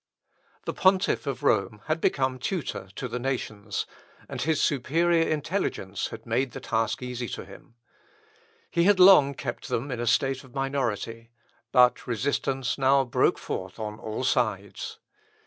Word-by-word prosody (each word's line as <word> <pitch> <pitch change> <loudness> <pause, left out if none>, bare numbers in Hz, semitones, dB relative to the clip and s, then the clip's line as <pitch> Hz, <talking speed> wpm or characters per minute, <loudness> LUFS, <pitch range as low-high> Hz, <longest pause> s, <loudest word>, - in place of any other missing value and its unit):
The - - -2
Pontiff 190 -4 +2
of 135 -3 -3
Rome 105 +1 +1
had 155 +1 -1
become 130 -2 +1
tutor 120 - -3
to 125 - -4
the 125 +1 -4
nations, 110 -5 -3 0.4
and - - -5
his 160 -1 +1
superior 165 +5 +2
intelligence 150 - -2
had - - -10
made 120 +2 0
the - - -6
task 115 +2 -1
easy 125 -1 -4
to - - -6
him. 115 - -15 1.0
He 170 0 +2
had 200 -1 +5
long 180 -7 +8
kept 120 -2 -5
them 135 +5 -2
in 125 - -3
a 120 - -2
state 135 +3 +2
of 130 -2 -17
minority, 115 -4 -2 0.4
but 125 0 +4
resistance 130 +2 -1
now 135 +1 +4
broke 120 - +2
forth - - -5
on 105 0 -5
all 110 +3 -4
sides. 110 -6 -1
130 Hz, 150 wpm, -27 LUFS, 115-140 Hz, 1.0 s, long